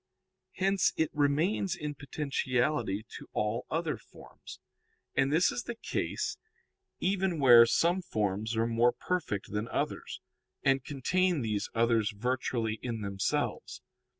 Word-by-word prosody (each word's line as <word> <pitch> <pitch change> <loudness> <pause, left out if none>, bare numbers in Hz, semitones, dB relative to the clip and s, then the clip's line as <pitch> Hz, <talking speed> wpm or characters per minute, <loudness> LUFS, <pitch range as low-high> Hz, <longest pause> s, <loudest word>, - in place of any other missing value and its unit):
Hence 195 0 +2
it 160 - +1
remains 160 +7 +1
in 150 -3 -4
potentiality 130 -6 -1
to - - -12
all 105 +2 -1
other 160 -1 -1
forms. - - -13 0.5
And 135 +1 +2
this 165 +4 +4
is 245 - -4
the 240 - -4
case - - -3 0.6
even 190 -2 0
where 120 -4 +8
some 175 +9 +2
forms 110 - -2
are 115 - +2
more 115 +1 +3
perfect 160 - -3
than 105 +2 -2
others, - - -3 0.4
and 135 -1 +3
contain 170 +5 +1
these 105 -3 -2
others 115 -2 +3
virtually 120 -1 -1
in 115 -3 -4
themselves. 100 -1 -2
130 Hz, 125 wpm, -30 LUFS, 115-165 Hz, 0.6 s, where